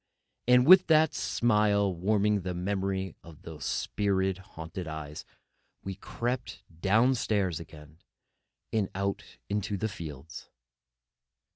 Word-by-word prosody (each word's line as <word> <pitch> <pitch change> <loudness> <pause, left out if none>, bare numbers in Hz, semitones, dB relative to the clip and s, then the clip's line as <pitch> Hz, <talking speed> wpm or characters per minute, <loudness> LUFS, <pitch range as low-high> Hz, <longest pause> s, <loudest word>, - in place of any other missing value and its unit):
And 125 0 +6
with 185 +3 +8
that 160 -1 +4
smile 105 -4 +2
warming 105 +3 +1
the 90 0 -4
memory 95 0 -2
of 80 -3 -14
those 80 -2 -8
spirit 95 -2 0
haunted 85 -2 -8
eyes, 75 -1 -7 0.6
we 95 - -4
crept 120 +5 -4 0.2
down 110 +7 +4
stairs 100 -9 0
again, 80 -1 -13 0.7
and 105 -4 +1
out 100 0 -2 0.2
into 100 0 -2
the 110 - -1
fields. 80 -5 -9
95 Hz, 115 wpm, -29 LUFS, 85-105 Hz, 0.7 s, with